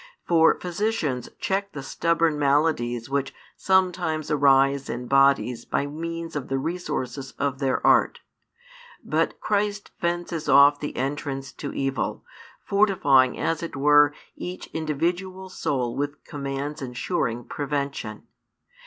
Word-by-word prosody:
For 165 -1 +4
physicians 175 - -2
check 200 +1 -2
the 140 - -6
stubborn 165 +1 +1
maladies 140 -5 +1
which 135 0 -2 0.2
sometimes 180 -5 +1
arise 140 -1 +3
in 125 +1 -4
bodies 135 -3 +3
by 140 - -1
means 165 +3 -5
of 145 -3 -3
the 135 - -1
resources 135 -4 -4
of 140 -1 -1
their 135 -2 0
art. - - +4 0.8
But - - 0
Christ 205 -1 -1
fences 170 -2 -2
off 145 +1 +7
the 150 - -5
entrance 135 0 -3
to 140 - -6
evil, 135 -1 -2 0.4
fortifying 145 - +3
as 165 -1 -1
it 170 - -5
were 145 +1 +5 0.2
each 180 +1 -6
individual 175 +5 -2
soul 125 -9 -2
with 145 +1 -3
commands 140 +1 -5
ensuring 125 -1 -2
prevention. 140 -7 -4
145 Hz, 120 wpm, -25 LUFS, 135-170 Hz, 0.8 s, off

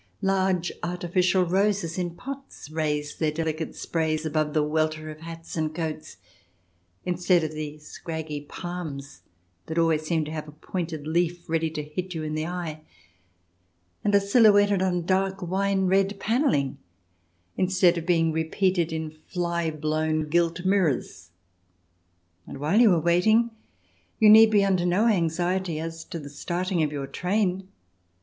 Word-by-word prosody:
Large 190 -2 +1
artificial 180 +1 +1
roses 190 -1 +1
in 175 -2 -3
pots 275 - -9
raise 150 -2 -2
their 155 -2 0
delicate 160 0 -3
sprays 160 -1 -1
above 155 -1 -1
the 155 - +3
welter 155 0 -1
of 155 - -11
hats 165 0 -9
and 155 -1 -2
coats, 155 - -5 0.9
instead 180 -1 +2
of 155 - -2
the 155 -1 -6
scraggy 155 0 -6
palms 145 - -7 0.5
that 160 - -4
always 165 -2 +3
seem 155 0 0
to 150 - -6
have 155 -1 -5
a 150 - -11
pointed 160 -1 -5
leaf 175 +2 -1
ready 165 -1 0
to 155 -1 -4
hit 180 +4 -5
you 160 - -3
in 155 0 -3
the 155 +1 -2
eye, 170 -3 -5 1.2
and 205 -1 +2
are - - +7
silhouetted 205 -2 +4
on 180 -2 0
dark 190 +1 +1
wine 190 +2 0
red 195 +2 +2
panelling 220 - +1 0.8
instead 185 -1 +3
of 170 - -3
being 165 -2 +3
repeated 170 +2 0
in 160 -1 -3 0.2
fly 170 -2 -1
blown 155 0 -1
gilt 170 +2 +1
mirrors. 155 - 0 1.2
And - - -8
while 155 - +2
you 225 -4 +7
are 170 - +3
waiting 215 +8 +3 0.7
you 215 -2 +7
need 220 +1 +9
be 205 -2 +4
under 185 -3 +2
no 180 +5 +2
anxiety 175 -3 +1
as 165 0 -5
to - - -6
the 145 -3 -8
starting 175 +4 -2
of 150 -2 +1
your 140 -2 -3
train. 185 +3 -1
170 Hz, 150 wpm, -26 LUFS, 155-185 Hz, 1.2 s, need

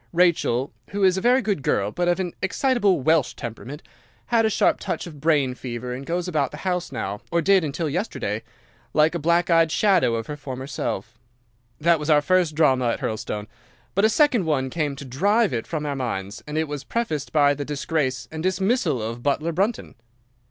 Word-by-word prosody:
Rachel—who 170 +1 +1
is 185 -1 +5
a 190 - -2
very 250 +3 +4
good 200 -7 -1
girl, 100 -5 0
but 175 +8 -1
of 175 +1 +2
an 180 -2 -2
excitable 205 - +2
Welsh 160 0 +2
temperament—had 150 - -4
a - - +1
sharp - - +2
touch 190 - -3
of 155 -5 -11
brain 145 -5 +2
fever, 125 0 -5
and 135 +2 -7
goes 175 +1 -1
about 150 -6 0
the 150 - -9
house 180 -1 -1
now—or 105 +12 -3
did 190 +2 +4
until 155 +2 -2
yesterday—like 120 - -2
a 170 - -2
black 170 +3 +2
eyed 165 -1 +4
shadow 185 - +3
of 115 -1 -3
her 150 - -5
former 130 -3 -6
self. 115 -4 -4 0.6
That 165 +1 +3
was 150 +1 -4
our 150 -1 +5
first 180 -2 +2
drama 130 -6 +3
at 115 - 0
Hurlstone; 105 -1 -3 0.5
but 200 - +1
a 220 - +6
second 245 - +3
one 130 -4 0
came 150 -4 -1
to 140 - -9
drive 200 - +2
it 115 -2 -3
from 155 -2 -3
our 145 -1 -2
minds, 105 -6 -4
and 150 +1 -4
it 160 0 0
was 145 -1 -5
prefaced 155 - -2
by 145 -2 +4
the 145 0 -4
disgrace 140 -4 -2
and 160 0 -5
dismissal 185 - +1
of 115 +2 -5
butler 150 +5 0
Brunton. 200 +8 -1
155 Hz, 190 wpm, -23 LUFS, 130-180 Hz, 0.6 s, a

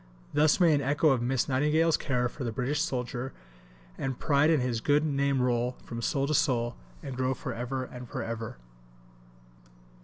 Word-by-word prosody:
Thus 155 +3 +4
may 170 -3 +5
an 145 - +2
echo 145 +3 +2
of 130 -4 +2
Miss 125 +1 0
Nightingale's 150 +4 +3
care 125 -3 0
for 130 +3 -7
the 115 - -2
British 135 +6 -1
soldier 125 -2 -3 0.7
and 130 -2 -2
pride 145 0 +3
in 160 -2 +4
his 125 -3 -1
good 145 +4 +3
name 140 -3 +1
roll 125 0 0
from 115 0 -6
soul 135 +3 0
to 155 - -1
soul, 125 -6 +1 0.3
and 135 - -5
grow 130 +1 0
for 125 - -5
ever 125 +3 -3
and 125 -1 -9
for - - -4
ever. 115 - -5
130 Hz, 180 wpm, -29 LUFS, 125-145 Hz, 0.7 s, may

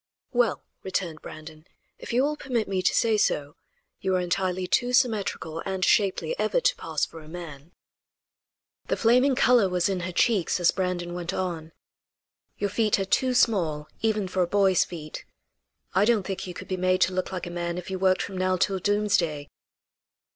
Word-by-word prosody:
"Well," 240 -5 +1 0.2
returned 180 -4 -3
Brandon, 155 +1 -11 0.3
"if - - -7
you 245 +3 +3
will 300 +1 0
permit 250 -6 -2
me 190 -1 -1
to 185 - +2
say 225 -2 +3
so, 145 -7 0 0.4
you 190 -1 0
are - - +2
entirely 185 +1 -1
too 245 +6 +1
symmetrical 215 -10 0
and 190 +1 -2
shapely 205 - +2
ever - - +2
to - - +2
pass - - -2
for 165 - -12
a 155 - -14
man." 160 -2 -9 1.2
The - - 0
flaming 250 +4 +4
color 245 -6 +4
was 180 +1 +1
in 190 -2 -1
her 180 +1 -4
cheeks, 190 -2 +1
as 175 - +4
Brandon 180 -2 -2
went 175 +1 -4
on: 170 -4 -3 0.9
"Your 205 -1 -2
feet 210 -1 +2
are 195 - 0
too 255 +6 +1
small, 165 -11 +1
even 215 -3 0
for 185 0 -1
a 175 - +2
boy's 195 -1 +3
feet. 155 -3 -8 0.7
I 190 - +4
don't 225 -3 +3
think 190 0 -5
you 180 - -7
could - - -8
be 185 - -2
made 185 0 +1
to 185 - +3
look 185 +1 -2
like 185 -2 -4
a 175 - -6
man 175 0 -3
if 180 +1 -6
you 190 - -3
worked 185 0 +2
from 190 -2 -6
now 185 0 +1
till 190 +1 +1
doomsday." 185 -7 0
185 Hz, 190 wpm, -26 LUFS, 175-210 Hz, 1.2 s, flaming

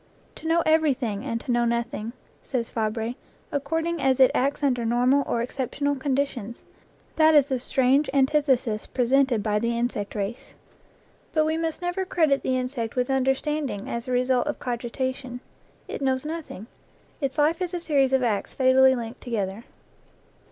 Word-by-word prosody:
"To 320 - -7
know 335 +1 +3
everything 275 -9 +1
and 230 -4 -2
to 255 - -3
know 240 0 +2
nothing," 235 -1 -2 0.3
says 240 -4 -3
Fabre, 225 +1 -2 0.4
"according 325 +3 -1
as 265 -1 +2
it 260 - +7
acts 280 +3 0
under 250 -4 +1
normal 250 +4 +3
or 235 - 0
exceptional 280 +3 -2
conditions: 260 -4 -2 0.5
that 315 0 +5
is 285 -1 +5
the 260 -2 0
strange 265 +3 +2
antithesis 265 -5 +1
presented 255 -2 +2
by 210 0 +1
the 235 +1 -1
insect 235 -4 -2
race." 205 +3 -5 0.8
But 310 -1 +3
we 315 +1 0
must 325 +1 -3
never 355 +2 -1
credit 315 -7 +2
the 260 0 0
insect 250 -3 -3
with 250 +1 0
under 265 0 +2
standing 290 -8 -3
as 235 0 -4
the - - -3
result 250 +2 +2
of 295 - -2
cogitation; 250 +1 -4 0.5
it - - -6
knows 265 0 0
noth 325 0 -5
ing; 200 - -8 0.6
its 270 -2 -2
life 310 +4 +2
is 360 0 -2
a - - -2
series 280 -5 +2
of 265 -1 +2
acts 215 -4 -1
fatally 260 0 +5
linked 235 0 -6
together. 215 -2 -3
260 Hz, 165 wpm, -25 LUFS, 235-285 Hz, 0.8 s, it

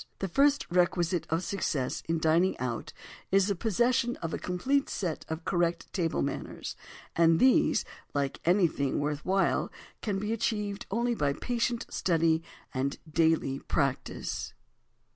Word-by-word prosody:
The 195 - -2
first 280 +8 +3
requisite 175 -1 +2
of 165 +3 0
success 150 -10 -1
in 165 - +2
dining 160 +4 +3
out 120 -2 -3 0.4
is 195 0 +4
the 200 - +1
possession 240 +4 +1
of 165 -1 -5
a - - -2
complete 265 +11 0
set 175 -6 -3
of 160 +1 -4
correct 175 -2 0
table 170 -4 0
manners—and 165 +3 -1
these, 260 0 +4 0.3
like 140 -1 -1
anything 170 -6 +2
worth 145 0 -2
while, 195 +1 +1 0.3
can 205 -3 -1
be 210 +3 -1
achieved 210 -1 -2
only 235 +3 +1
by 145 -10 +1
patient 240 - -1
study 165 -2 +2 0.3
and 135 +1 -1 0.2
daily 160 -4 +2
practise. 140 -3 -2
175 Hz, 135 wpm, -29 LUFS, 160-210 Hz, 0.4 s, is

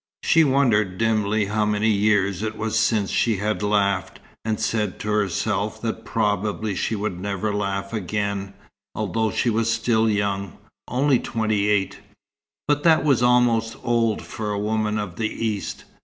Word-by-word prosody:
She 165 - +5
wondered 115 -10 +2
dimly 110 -1 +1
how 105 +2 0
many 105 +1 +1
years 100 -2 +2
it 110 0 -3
was 110 0 0
since 105 -4 +1
she 115 -4 +1
had 105 +2 -1
laughed, 100 -2 0 0.2
and 110 -1 -1
said 110 -3 -1
to 105 - -4
herself 105 -3 -1
that - - -3
probably 105 +1 -1
she 110 - -1
would 100 -4 -3
never 100 +2 -2
laugh 100 0 -2
again, 100 -1 -3 0.4
although 110 +1 0
she 120 +3 0
was 115 +1 +1
still 115 -1 +2
young, 100 -2 -1 0.3
only 130 0 +2
twenty 110 -2 -1
eight. 100 -2 0 0.7
But 145 -1 +2
that 160 0 +4
was 140 -6 +3
almost 120 -2 +3
old 115 -2 +1
for 110 -1 -5
a 105 - -1
woman 105 0 0
of 105 -4 -5
the 110 -1 -1
East. 110 -3 -4
105 Hz, 155 wpm, -23 LUFS, 100-115 Hz, 0.7 s, She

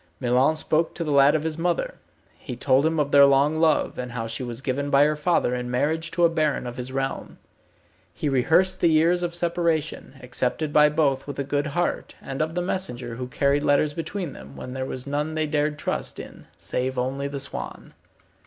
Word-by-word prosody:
Milon 130 +4 +2
spoke 155 +1 0
to 170 - -3
the 155 - -2
lad 140 +1 +5
of 155 - 0
his 160 0 -3
mother. 180 - 0 0.5
He 125 - -7
told 135 +4 +3
him 160 -1 0
of 145 -1 0
their 140 0 +8
long 140 +3 +3
love, 160 -2 +2
and 125 -1 -5
how 115 -2 -3
she 115 +3 -5
was 120 -2 -5
given 135 +2 -2
by 140 0 +5
her 150 0 +1
father 150 -4 +1
in 125 0 -3
marriage 155 +6 0
to 175 - 0
a - - +7
baron 155 -5 0
of 120 0 -6
his 125 +1 -5
realm. 135 0 -4 0.7
He - - -4
rehearsed 160 +8 +2
the 175 - +3
years 165 +3 +3
of 170 -1 -2
separation, 170 -4 -1
accepted 125 +4 -2
by 150 0 +6
both 145 -3 0
with 145 - -6
a 140 - -1
good 145 +2 -1
heart, 175 +4 -2
and 135 +1 -5
of 160 +2 -2
the 180 - 0
messenger 125 -11 -3
who 125 0 -4
carried 140 +1 +1
letters 145 +1 +2
between 165 -1 -4
them, 70 +1 -12
when 125 - -7
there 130 0 -3
was 130 -1 -6
none 150 +2 -2
they 155 0 0
dared 150 0 0
to - - -9
trust - - -3
in, - - -11
save 130 +1 -2
only 135 +3 -2
the 140 0 -5
swan. 135 - -6
145 Hz, 215 wpm, -24 LUFS, 130-160 Hz, 0.7 s, their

